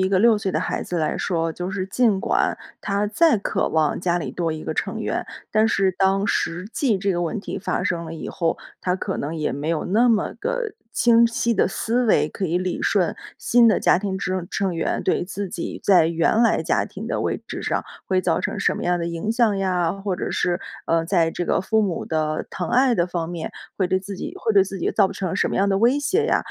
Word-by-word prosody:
一 190 - +2
个 190 -1 +2
6 225 -1 +5
岁 195 -2 -2
的 - - 0
孩 - - -2
子 180 - -4
来 155 -2 0
说， 165 -2 -1
就 180 +2 -4
是 190 -1 -3
尽 210 -1 +2
管 - - +1 0.2
她 205 0 0
再 290 +6 +4
渴 200 - -1
望 155 -2 +1
家 175 -1 +1
里 - - -4
多 165 -2 -2
1 155 - -6
个 - - -4
成 - - -2
员， - - -2 0.2
但 215 +1 +3
是 195 -3 +2
当 195 +2 +1
实 180 +1 -1
际 230 -9 +1
这 195 +1 0
个 175 0 -1
问 175 +5 -2
题 - - -5
发 200 - -2
生 170 -1 -1
了 160 - -7
以 160 - -6
后， 165 -2 -1 0.2
她 180 - 0
可 190 +1 -3
能 150 +4 -3
也 155 -2 -1
没 145 +3 -4
有 165 -2 0
那 225 +7 +3
么 225 -3 +1
的 475 -2 -2 0.2
清 235 -1 +5
晰 235 0 0
的 195 - +2
思 235 +5 0
维， - - +3
可 190 - -3
以 170 +2 0
理 180 -1 -1
顺 - - +1 0.2
新 235 -1 +4
的 215 - +3
家 175 - +4
庭 195 -1 -3
之 185 -2 -2
成 190 -3 -1
员 165 - -1
对 - - +1
自 200 +1 -4
己 175 -1 -5
在 180 -5 +5
原 170 +7 +2
来 230 - +3
家 - - +1
庭 - - -8
的 - - -2
位 - - -2
置 - - -5
上 - - -1 0.2
会 185 -1 +1
造 165 -2 +1
成 - - -3
什 - - +1
么 - - -5
样 175 0 +1
的 170 - -2
影 170 +6 -3
响 225 -4 +2
呀， 180 -3 +1
或 195 -2 -3
者 - - -3
是， 175 0 0 0.3
呃， 165 0 +2
在 165 -2 +2
这 175 - -3
个 - - +1
父 220 +3 +1
母 185 -5 -2
的 155 -1 -1
疼 180 - -4
爱 255 0 +4
的 175 -4 +1
方 170 -2 -3
面 170 -2 -5 0.3
会 190 - +1
对 185 +1 +1
自 195 0 -7
己 - - -5
会 220 -2 0
对 195 - +6
自 195 0 -6
己 - - 0
造 200 -3 +2
成 185 -1 -3
什 - - +1
么 - - -2
样 200 +1 +2
的 195 - +2
威 240 +7 +3
胁 380 +10 +1
呀。 - - +3
190 Hz, 260 characters per minute, -23 LUFS, 170-215 Hz, 0.3 s, 对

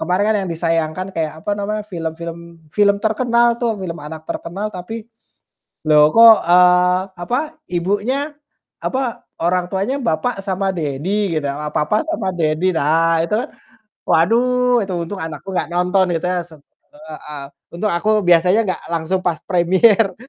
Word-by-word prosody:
kemarin 185 +3 0
kan 220 - +2
yang - - -5
disayangkan 165 +2 -1
kayak, 155 -2 -1
apa - - -2
namanya, 210 +1 -2
film 165 -4 -4
film 170 0 -6 0.3
film 200 -1 +3
terkenal 235 +1 +2
tuh 230 -3 0
film 170 -3 -5
anak 155 +1 -9
terkenal 195 +5 -4
tapi, 210 +5 -7 0.8
loh 150 0 +6
kok, 230 0 +9
eee, 180 +1 +5 0.2
apa, 245 +8 0 0.3
ibunya, 205 - -1 0.5
apa 260 -3 -2 0.2
orang 180 +1 +1
tuanya 200 +8 -1
bapak 195 +3 -1
sama 195 0 -1
daddy 170 +5 -2
gitu, 145 - -4 0.3
papa 210 +8 +1
sama 310 -12 -3
daddy, 165 +2 +1
nah 165 +2 +2
itu 210 - -2
kan, - - -3 0.6
waduh 245 +7 +3
itu 190 -2 -4
untung 195 +1 -6
anakku 160 +4 -7
gak - - 0
nonton 180 +2 +2
gitu 165 - -2
yah 180 -1 -1
su 160 -2 -15 0.4
heeh, 150 -1 -9 0.3
untung 210 +4 -1
aku 175 +5 0 0.2
biasanya 180 +5 +4
gak - - -4
langsung 170 +3 -1
pas 170 -3 0
premiere 190 +4 +3
185 Hz, 150 wpm, -19 LUFS, 165-215 Hz, 0.8 s, kok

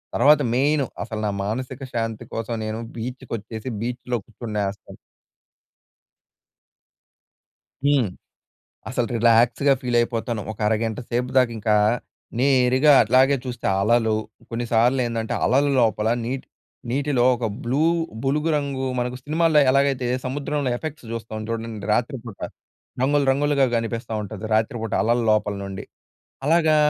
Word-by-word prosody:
తర్వాత 150 +1 +6
మెయిను 140 +2 +2 0.2
అసలు 110 0 -5
నా - - 0
మానసిక 130 +4 -4
శాంతి 115 -2 -3
కోసం 115 +1 -3
నేను 110 +1 -3 0.2
బీచ్‍కి 125 +3 -6
వచ్చేసి 110 +3 -7
బీచ్‌లో 125 +1 -2
కూర్చునేస్తాను. 105 -3 -5 2.9
హ్మ్, 140 -5 +3 0.8
అసలు 120 -1 0
రిలాక్స్‌గా 120 +4 +4
ఫీల్ 125 -1 -1
అయిపోతాను. 120 -1 -2
ఒక 105 - -16
అరగంట 110 0 -1
సేపు 125 +1 -1
దాక 125 -2 +5
ఇంకా 105 0 +1 0.6
నేరుగా 130 +2 +4
అట్లాగే 130 +5 +4
చూస్తే, 125 -2 -5
అలలు 110 +1 +3 0.4
కొన్నిసార్లు 120 +2 +2
ఏందంటే 115 -1 -2
అలల 140 +3 +3
లోపల 110 -1 +2 0.2
నీటి 130 +2 -4 0.4
నీటిలో 135 -1 +1
ఒక 115 -1 -2 0.2
బ్లూ 130 +5 0 0.4
బులుగు 150 +4 +1
రంగు 140 -2 -1
మనకు 125 +1 -2
సినిమాల్లో 155 +1 +3
ఎలాగైతే 135 -2 +2 0.2
సముద్రంలో 140 +1 -2
ఎఫెక్ట్స్ 155 -2 -7
చూస్తాం 110 -1 -5
చూడండి 115 -2 -4
రాత్రిపూట. 120 -2 -2 0.6
రంగులు 145 +1 +3
రంగులుగా 140 0 +2
కనిపిస్తా 115 0 -3
ఉంటది! 105 +1 -7
రాత్రిపూట 110 0 -1
అలల 120 +2 +2
లోపల 105 -1 +2
నుండి. 95 0 -6 0.6
అలాగా 160 0 +4
120 Hz, 120 wpm, -23 LUFS, 115-135 Hz, 2.9 s, తర్వాత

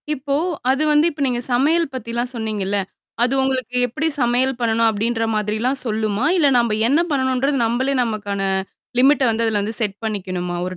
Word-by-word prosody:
இப்போ 280 0 -2 0.4
அது 270 +3 +1
வந்து 300 +1 +4
இப்ப 295 -1 -9
நீங்க 245 -1 -1
சமையல் 310 +7 +3
பத்திலாம் 240 0 -3
சொன்னீங்கல்ல? 210 -3 -2 0.5
அது 250 +2 +1
உங்களுக்கு 260 -2 -1
எப்படி 305 +7 -2
சமையல் 245 +2 +1
பண்ணணும் 230 -1 +2
அப்படின்ற 225 +2 -1
மாதிரிலாம் 220 +6 -1
சொல்லுமா? 215 +1 -1
இல்ல 295 -5 +4
நம்ப 235 -2 +1 0.2
என்ன 290 +5 +3
பண்ணணுன்றது, 265 0 +1
நம்பளே 260 +4 0
நமக்கான 205 -3 -2 0.5
லிமிட்ட 280 +2 +4
வந்து 225 +1 0
அதுல 215 -2 +1
வந்து 215 +2 -1
செட் 205 -3 -2
பண்ணிக்கணுமா? 185 -4 -3
ஒரு 185 0 -5
235 Hz, 160 wpm, -20 LUFS, 215-265 Hz, 0.5 s, வந்து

